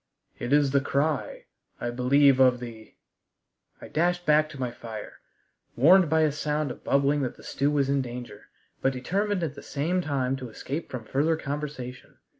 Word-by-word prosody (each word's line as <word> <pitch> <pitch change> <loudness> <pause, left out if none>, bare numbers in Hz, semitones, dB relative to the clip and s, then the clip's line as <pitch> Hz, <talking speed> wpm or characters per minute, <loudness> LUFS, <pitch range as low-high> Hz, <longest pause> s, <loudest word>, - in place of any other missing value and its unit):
It 120 - -4
is 145 -1 +4
the 140 0 +3
cry, 145 +2 -1 0.3
I 120 - -2
believe 135 +2 +4
of 125 -2 +5
the 115 -3 -10 0.4
" - - -41
I - - -7
dashed 175 +2 0
back 155 0 +4
to 140 - -10
my 125 -2 -2
fire, 115 -3 -9 0.6
warned 170 +6 +6
by 160 +1 +3
a 155 -1 +3
sound 150 -1 -2
of - - -10
bubbling 140 +1 +2
that 130 - -3
the - - -15
stew 140 +1 0
was 145 -2 +1
in 140 0 +1
danger, 125 -1 -8 0.4
but 135 - +2
determined 190 +9 -1
at 155 -4 -2
the 140 - -10
same 165 +6 -1
time 135 -5 -1
to 130 -2 -7
escape 140 +8 -5
from 125 -3 -6
further 150 +7 +1
conversation. 140 -4 -6
140 Hz, 185 wpm, -27 LUFS, 125-155 Hz, 0.6 s, warned